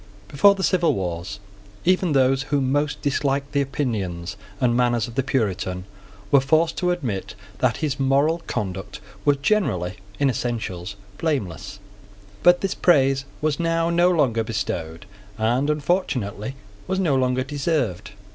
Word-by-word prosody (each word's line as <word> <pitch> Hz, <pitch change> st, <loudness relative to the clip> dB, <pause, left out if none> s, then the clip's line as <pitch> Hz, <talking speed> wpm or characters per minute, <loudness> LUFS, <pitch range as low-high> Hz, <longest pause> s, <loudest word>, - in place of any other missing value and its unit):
Before 200 Hz, -, +5 dB
the 190 Hz, -, -4 dB
civil 175 Hz, -3 st, +2 dB
wars, 95 Hz, +2 st, -4 dB, 0.5 s
even 185 Hz, -2 st, +3 dB
those 135 Hz, 0 st, +3 dB
who 145 Hz, -, +2 dB
most 145 Hz, +3 st, 0 dB
disliked 140 Hz, -1 st, 0 dB
the 140 Hz, -, +2 dB
opinions 100 Hz, -10 st, -3 dB, 0.2 s
and 120 Hz, -2 st, +2 dB
manners 120 Hz, -2 st, +2 dB
of 120 Hz, -, -9 dB
the 135 Hz, -, +1 dB
Puritan 100 Hz, -8 st, -1 dB, 0.5 s
were 140 Hz, -, +7 dB
forced 155 Hz, +5 st, +2 dB
to 180 Hz, -, +1 dB
admit 130 Hz, -, -3 dB, 0.2 s
that -, -, +2 dB
his 140 Hz, -2 st, -2 dB
moral 140 Hz, +5 st, +2 dB
conduct 95 Hz, -2 st, -4 dB, 0.3 s
was 145 Hz, -1 st, +4 dB
generally, 100 Hz, -, +1 dB, 0.2 s
in 140 Hz, -, +2 dB
essentials, 105 Hz, -7 st, -3 dB, 0.2 s
blameless; 95 Hz, -, -2 dB, 0.6 s
but 175 Hz, 0 st, +5 dB
this 195 Hz, -, 0 dB
praise 135 Hz, -5 st, +3 dB, 0.2 s
was 150 Hz, -2 st, 0 dB
now 165 Hz, 0 st, +1 dB
no 175 Hz, +1 st, +4 dB
longer 130 Hz, -10 st, +2 dB
bestowed, 85 Hz, -7 st, -4 dB, 0.3 s
and, 120 Hz, +6 st, +1 dB
unfortunately, 140 Hz, -, -1 dB, 0.3 s
was 190 Hz, -, -1 dB
no 165 Hz, -8 st, +2 dB
longer 130 Hz, 0 st, +1 dB
deserved. 135 Hz, -, -1 dB
135 Hz, 140 wpm, -23 LUFS, 105-155 Hz, 0.6 s, were